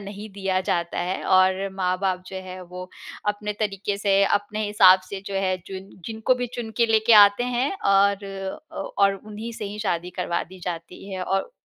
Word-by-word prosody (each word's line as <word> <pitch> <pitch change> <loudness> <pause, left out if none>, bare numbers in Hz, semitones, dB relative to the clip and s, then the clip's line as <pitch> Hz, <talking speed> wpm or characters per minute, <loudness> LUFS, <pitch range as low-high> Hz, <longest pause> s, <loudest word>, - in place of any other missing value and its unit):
नहीं 205 +2 -8
दिया 190 -1 -1
जाता 170 -2 -1
है। 180 +2 -2
और 185 +1 +3
माँ-बाप 185 0 0
जो 190 - -7
है 185 0 -8
वो 180 +1 -9 0.4
अपने 210 0 -2
तरीक़े 200 -1 -1
से 200 -1 +3
अपने 205 +2 0
हिसाब 190 -3 +7
से 200 - -5
जो 200 - -5
है 190 -1 +1
जिन 190 0 -8 0.2
जिनको 225 +3 +1
भी 250 0 -2
चुन 235 -2 -5
के 235 - +4
लेके 225 +1 +3
आते 205 +4 +4
हैं 250 +2 0
और 200 0 +3 0.5
अ, - - -11 0.2
और 200 -1 +5
उन्हीं 215 +3 -8
से 225 -1 -6
ही 205 +1 -6
शादी 180 -4 -2
करवा 175 -1 -1
दी 185 +2 -13
जाती 175 +2 -6
है 185 -1 -3
और 195 - -1
195 Hz, 190 wpm, -24 LUFS, 185-210 Hz, 0.5 s, हिसाब